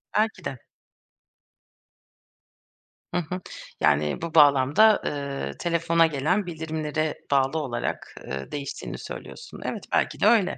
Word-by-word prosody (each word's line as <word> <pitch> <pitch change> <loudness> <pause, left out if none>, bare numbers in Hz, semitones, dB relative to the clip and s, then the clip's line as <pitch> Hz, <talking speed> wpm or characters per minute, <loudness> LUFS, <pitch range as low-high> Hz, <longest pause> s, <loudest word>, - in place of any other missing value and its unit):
Belki 215 -4 +1
de. 135 - -3 2.5
Hı - - -1
hı. 175 +2 -3 0.4
Yani, 75 0 +2
bu 165 -1 -4
bağlamda, 145 +8 +6
ııı, 140 - -3
telefona 170 -1 +3
gelen 160 +7 0
bildirimlere 155 -2 -2
bağlı 135 +2 +3
olarak, 125 -6 -4
ııı, 65 0 -6
değiştiğini 140 -1 -5
söylüyorsun. 485 - -9
Evet, - - -3
belki - - +1
de - - +2
öyle. 210 -6 +4
155 Hz, 115 wpm, -25 LUFS, 140-175 Hz, 2.5 s, bağlamda